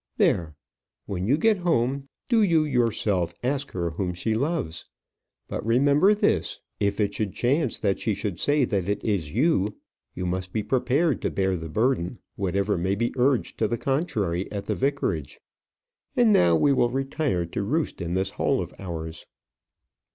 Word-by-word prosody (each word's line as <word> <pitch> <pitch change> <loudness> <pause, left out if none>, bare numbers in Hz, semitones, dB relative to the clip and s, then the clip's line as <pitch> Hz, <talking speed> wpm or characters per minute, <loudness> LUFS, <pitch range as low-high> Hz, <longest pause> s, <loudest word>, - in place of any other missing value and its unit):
There; 80 -3 +2 0.5
when 95 -1 -3
you 140 +5 +4
get 215 +5 +3
home, 135 -5 0 0.2
do 230 -3 +3
you 165 -6 +4
yourself 110 - 0
ask 140 +2 -1
her 85 -2 -2
whom 90 +1 -3
she 110 +5 -1
loves. 130 - -2 0.6
But - - -4
remember 140 - +4
this 210 - 0 0.2
if 100 0 0
it 100 -1 +1
should 105 -3 -3
chance 135 +1 +1
that 100 -3 0
she 110 -2 0
should 95 -5 -4
say 145 -2 +3
that 100 -4 -1
it 100 0 -1
is 95 -7 -1
you, 110 - +2 0.4
you 90 - -3
must 90 0 -3
be 110 - 0
prepared 135 +6 +1
to - - 0
bear 95 -1 0
the 80 -2 -6
burden, 110 - 0 0.2
whatever 100 0 0
may 95 +3 0
be 115 +3 -1
urged 130 0 +1
to 110 - +2
the 120 - -1
contrary 105 - -1
at 100 -1 -4
the - - -1
vicarage. 105 - -1 0.8
And 235 -3 +5
now 85 - +5
we 140 - +4
will 120 -2 +3
retire 135 - -1
to 85 - -4
roost 145 +3 -1
in 85 +1 -2
this 95 +1 0
hole - - +1
of - - -5
ours." 80 -4 -6
110 Hz, 175 wpm, -25 LUFS, 90-140 Hz, 0.8 s, And